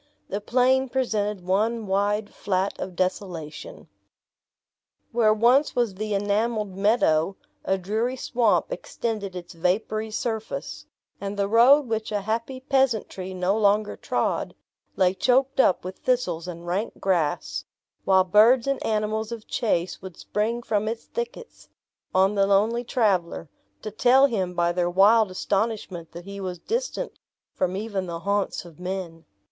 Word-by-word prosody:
The 200 Hz, +2 st, -3 dB
plain 260 Hz, +4 st, +2 dB
presented 210 Hz, -7 st, -1 dB
one 215 Hz, +4 st, +1 dB
wide 205 Hz, +2 st, 0 dB
flat 190 Hz, 0 st, -1 dB
of 185 Hz, -1 st, -5 dB
desolation. 185 Hz, -, -4 dB, 1.2 s
Where 230 Hz, -3 st, +4 dB
once 240 Hz, +7 st, +3 dB
was 240 Hz, -5 st, +1 dB
the 210 Hz, +2 st, -3 dB
enameled 205 Hz, 0 st, 0 dB
meadow, 195 Hz, -4 st, +2 dB, 0.3 s
a 190 Hz, -, +1 dB
dreary 220 Hz, +7 st, -1 dB
swamp 230 Hz, -8 st, +1 dB
extended 205 Hz, -1 st, -4 dB
its 175 Hz, 0 st, -8 dB
vapory 210 Hz, +6 st, -1 dB
surface; 220 Hz, 0 st, -4 dB, 0.3 s
and 200 Hz, 0 st, -4 dB
the 200 Hz, -1 st, +1 dB
road 240 Hz, +7 st, +6 dB
which 220 Hz, -2 st, -3 dB
a 205 Hz, -1 st, -1 dB
happy 230 Hz, +5 st, -3 dB
peasantry 240 Hz, -9 st, 0 dB
no 185 Hz, +2 st, +1 dB
longer 210 Hz, 0 st, +2 dB
trod, -, -, -2 dB, 0.4 s
lay 185 Hz, -1 st, +3 dB
choked 260 Hz, +7 st, +2 dB
up 190 Hz, -, +4 dB
with 185 Hz, +1 st, -7 dB
thistles 185 Hz, -10 st, -1 dB
and 170 Hz, -1 st, -7 dB
rank 185 Hz, +6 st, -3 dB
grass; 175 Hz, -6 st, -1 dB, 0.4 s
while 190 Hz, -1 st, +4 dB
birds 220 Hz, +6 st, +5 dB
and 275 Hz, -1 st, -1 dB
animals 215 Hz, +1 st, -1 dB
of 230 Hz, -2 st, -6 dB
chase 180 Hz, -6 st, -1 dB
would 190 Hz, -3 st, -9 dB
spring 230 Hz, +3 st, -2 dB
from 215 Hz, -1 st, 0 dB
its 225 Hz, +1 st, -3 dB
thickets, 475 Hz, 0 st, -7 dB, 0.4 s
on 190 Hz, +2 st, +3 dB
the 195 Hz, -1 st, +2 dB
lonely 215 Hz, +5 st, +2 dB
traveler, 190 Hz, -, 0 dB, 0.3 s
to 215 Hz, -, -5 dB
tell 255 Hz, +5 st, +5 dB
him 190 Hz, -9 st, -1 dB
by 170 Hz, 0 st, +2 dB
their 175 Hz, 0 st, 0 dB
wild 205 Hz, +4 st, +5 dB
astonishment 195 Hz, -3 st, -2 dB
that 170 Hz, +1 st, -10 dB
he 200 Hz, 0 st, -7 dB
was 180 Hz, -2 st, -4 dB
distant -, -, -3 dB, 0.3 s
from 185 Hz, +1 st, -1 dB
even 200 Hz, -3 st, -3 dB
the 170 Hz, -1 st, -5 dB
haunts 200 Hz, -2 st, -1 dB
of 170 Hz, -1 st, -14 dB
men. 180 Hz, -3 st, -5 dB
205 Hz, 145 wpm, -25 LUFS, 185-230 Hz, 1.2 s, road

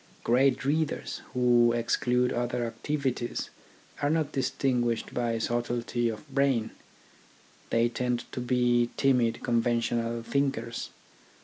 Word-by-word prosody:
Great 135 Hz, +3 st, +3 dB
readers, 155 Hz, +2 st, -1 dB
who 120 Hz, -1 st, +4 dB
exclude 125 Hz, +1 st, +1 dB
other 120 Hz, 0 st, -1 dB
activities, 125 Hz, +1 st, -3 dB, 0.5 s
are 145 Hz, -, +2 dB
not 155 Hz, -1 st, +1 dB
distinguished 125 Hz, -3 st, 0 dB
by 120 Hz, -2 st, 0 dB
subtlety 120 Hz, +1 st, -1 dB
of 110 Hz, +7 st, -7 dB
brain. 135 Hz, -5 st, +2 dB, 1.0 s
They 115 Hz, +1 st, +3 dB
tend 120 Hz, 0 st, -1 dB
to -, -, -5 dB
be 120 Hz, -1 st, +2 dB
timid 125 Hz, -4 st, +2 dB
conventional 115 Hz, 0 st, 0 dB
thinkers. 125 Hz, -3 st, -1 dB
120 Hz, 105 wpm, -28 LUFS, 115-130 Hz, 1.0 s, who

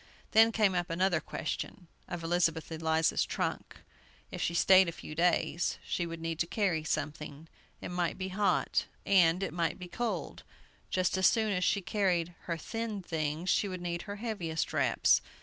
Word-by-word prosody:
Then 225 Hz, +1 st, +6 dB
came 215 Hz, -4 st, +3 dB
up 175 Hz, -1 st, -1 dB
another 175 Hz, 0 st, +2 dB
question, 175 Hz, +2 st, -5 dB, 0.2 s
of 175 Hz, -1 st, -5 dB
Elizabeth 165 Hz, -1 st, 0 dB
Eliza's 160 Hz, 0 st, +1 dB
trunk. -, -, -4 dB, 0.5 s
If -, -, -5 dB
she 170 Hz, -, 0 dB
stayed 190 Hz, 0 st, +6 dB
a -, -, -3 dB
few 160 Hz, -, -9 dB
days, 170 Hz, +1 st, +1 dB
she 175 Hz, -, -2 dB
would 165 Hz, 0 st, -6 dB
need 165 Hz, 0 st, -4 dB
to 165 Hz, -, +1 dB
carry 180 Hz, -6 st, 0 dB
something. 150 Hz, 0 st, -4 dB, 0.3 s
It -, -, -5 dB
might 175 Hz, -1 st, -1 dB
be 190 Hz, 0 st, -3 dB
hot, 200 Hz, +2 st, +1 dB, 0.2 s
and 180 Hz, -1 st, +4 dB
it -, -, -3 dB
might 170 Hz, 0 st, -1 dB
be 180 Hz, -2 st, -8 dB
cold. 200 Hz, -, -3 dB, 0.5 s
Just 185 Hz, 0 st, +1 dB
as 190 Hz, -, +6 dB
soon 220 Hz, -2 st, +2 dB
as 180 Hz, -1 st, 0 dB
she 200 Hz, -, +2 dB
carried 175 Hz, -2 st, 0 dB
her 170 Hz, -1 st, -2 dB
thin 220 Hz, +3 st, -4 dB
things, 160 Hz, +1 st, -1 dB
she 205 Hz, -, +2 dB
would 185 Hz, -1 st, -5 dB
need 170 Hz, -1 st, -2 dB
her 205 Hz, -, -3 dB
heaviest 200 Hz, -8 st, -3 dB
wraps. -, -, +3 dB
175 Hz, 175 wpm, -31 LUFS, 165-195 Hz, 0.5 s, Then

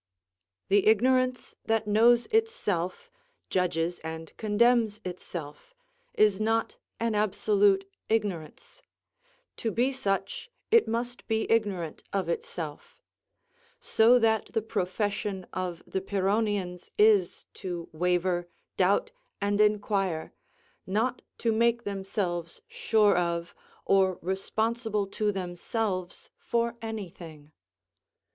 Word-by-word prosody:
The 200 Hz, +1 st, +4 dB
ignorance 255 Hz, +3 st, +3 dB
that 225 Hz, -1 st, +1 dB
knows 230 Hz, +3 st, +5 dB
itself, 215 Hz, -, -1 dB, 0.4 s
judges 175 Hz, -1 st, 0 dB
and 160 Hz, 0 st, -7 dB
condemns 220 Hz, 0 st, +2 dB
itself, 175 Hz, -, -7 dB, 0.4 s
is 210 Hz, -2 st, +4 dB
not 225 Hz, +1 st, 0 dB, 0.2 s
an 230 Hz, -1 st, 0 dB
absolute 205 Hz, -1 st, +2 dB, 0.2 s
ignorance; 220 Hz, -, -3 dB, 0.8 s
to 230 Hz, -, -1 dB
be 245 Hz, +5 st, +1 dB
such, 195 Hz, -, -2 dB, 0.2 s
it 460 Hz, 0 st, +6 dB
must 240 Hz, +2 st, -3 dB
be 220 Hz, -1 st, +1 dB
ignorant 195 Hz, -8 st, 0 dB
of 195 Hz, -1 st, -1 dB
itself; 480 Hz, +1 st, -5 dB, 0.8 s
so 235 Hz, +3 st, +5 dB
that 225 Hz, -2 st, +2 dB
the 225 Hz, -, 0 dB
profession 205 Hz, -1 st, -2 dB
of 180 Hz, -2 st, -4 dB
the 190 Hz, -, -3 dB
Pyrrhonians 195 Hz, -2 st, -1 dB
is 205 Hz, -4 st, +4 dB
to 175 Hz, -2 st, -5 dB
waver, 175 Hz, +1 st, 0 dB, 0.3 s
doubt, -, -, +2 dB, 0.3 s
and 205 Hz, +1 st, +1 dB
inquire, 200 Hz, -5 st, +1 dB, 0.5 s
not 225 Hz, +6 st, 0 dB, 0.2 s
to 230 Hz, -, +1 dB
make 235 Hz, +1 st, +2 dB
themselves 190 Hz, -4 st, -3 dB
sure 215 Hz, -2 st, +3 dB
of, 170 Hz, -1 st, -1 dB, 0.3 s
or 190 Hz, -2 st, +3 dB
responsible 215 Hz, +3 st, -1 dB
to 210 Hz, +2 st, -1 dB
themselves 185 Hz, 0 st, -3 dB
for 235 Hz, 0 st, -1 dB
any 220 Hz, -5 st, -5 dB
thing. 155 Hz, -4 st, -12 dB
205 Hz, 105 wpm, -28 LUFS, 185-225 Hz, 0.8 s, it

